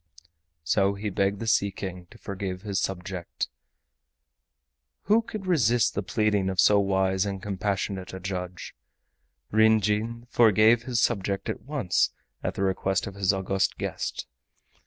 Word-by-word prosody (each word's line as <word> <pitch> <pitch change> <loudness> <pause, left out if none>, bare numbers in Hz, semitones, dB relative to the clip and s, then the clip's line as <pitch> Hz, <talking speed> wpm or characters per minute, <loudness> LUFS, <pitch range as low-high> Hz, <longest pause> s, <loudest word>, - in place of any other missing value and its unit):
So 100 +6 +2
he 105 +1 -4
begged 100 +1 0
the 115 - -4
Sea 110 -3 +3
King 95 -2 -7
to - - -15
forgive 95 -1 -5
his 100 -3 -1
subject. 90 -1 -4 1.5
Who 215 +3 +4
could 215 -3 -7
resist 120 - +3
the 100 - -1
pleading 105 -1 +1
of 95 -1 -3
so 100 +2 +6
wise 95 -1 +1
and 100 -1 -3
compassionate 95 -1 -3
a 95 - -7
judge? 90 -1 -5 0.8
Ryn 110 +1 +5
Jin 110 +3 -1
forgave 110 +1 +5
his 125 -2 0
subject 100 -4 0
at - - -3
once 130 - +1 0.3
at - - -3
the 95 - -1
request 95 0 0
of 100 - -6
his 100 -1 +2
august 95 0 0
guest. - - -4
100 Hz, 145 wpm, -26 LUFS, 95-110 Hz, 1.5 s, so